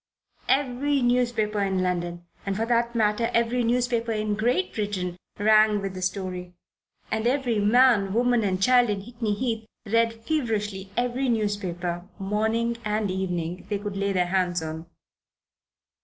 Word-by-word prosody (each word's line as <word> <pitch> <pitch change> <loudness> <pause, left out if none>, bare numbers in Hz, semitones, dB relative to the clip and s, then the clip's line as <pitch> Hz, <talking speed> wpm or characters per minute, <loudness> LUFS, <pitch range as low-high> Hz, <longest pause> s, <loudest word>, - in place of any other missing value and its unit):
Every 275 0 +1
newspaper 240 -4 +1
in 190 -2 0
London 175 -1 -2 0.2
and 195 -1 -2
for 225 - 0
the 235 0 +2
matter 215 0 +2
of - - -2
that, - - +4
every 235 +1 +1
newspaper 235 -1 +1
in 215 -1 -1
Great 245 - 0
Britain 195 -4 -2 0.2
rang 215 0 +5
with 195 -1 -4
the 185 - -6
story, 185 -1 -3 0.6
and 220 +1 0
every 250 -4 +1
man, 210 -2 +4
woman 240 +1 +2
and 185 -2 0
child 245 +3 +4
in 200 -1 -1
Hickney 230 -2 -3
Heath 225 -3 -2 0.2
read 230 +1 +1
feverishly 210 -9 -2
every 250 +2 0
newspaper, 185 -5 -2
morning 220 +4 0
and 210 -2 -1
evening, 180 -2 -3
they 205 - 0
could 205 0 -5
lay 200 0 0
their 180 -2 +2
hands 180 -2 0
on. 160 +1 -6
215 Hz, 155 wpm, -25 LUFS, 190-235 Hz, 0.6 s, rang